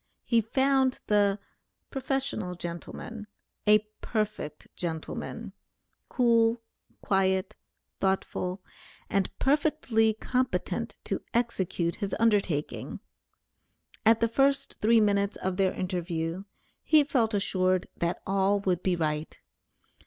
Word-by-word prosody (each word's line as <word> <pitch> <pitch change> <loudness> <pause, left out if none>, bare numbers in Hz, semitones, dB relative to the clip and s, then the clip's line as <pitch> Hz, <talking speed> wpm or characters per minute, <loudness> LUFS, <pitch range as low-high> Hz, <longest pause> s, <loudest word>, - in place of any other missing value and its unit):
He 235 -2 +3
found 265 +3 +2
the 205 -1 +3 0.5
"Prof. 270 - -2
gentleman" 175 +5 -7 0.4
a 210 0 +6 0.2
perfect 215 -9 -3
gentleman; 160 -3 -5 0.6
cool, 230 -1 +3 0.4
quiet, 190 0 +1 0.4
thoughtful, 190 -1 -1 0.5
and 195 -2 +2
perfectly 270 -7 +2
competent 255 +3 -1
to - - -2
execute 190 -7 0
his 200 -3 -2
undertaking. 200 -10 0 1.0
At 225 +1 +5
the 230 - +4
first 275 +3 +1
three 225 +2 +5
minutes 200 -1 +2
of 185 -1 -2
their 190 -1 +3
interview, 175 -1 -3 0.4
he 310 -2 +5
felt 235 -6 +1
assured 185 -2 +1
that 170 +1 -2
all 195 +1 +2
would 185 -3 0
be 185 -1 +1
right. 155 -2 -2
205 Hz, 100 wpm, -28 LUFS, 185-230 Hz, 1.0 s, a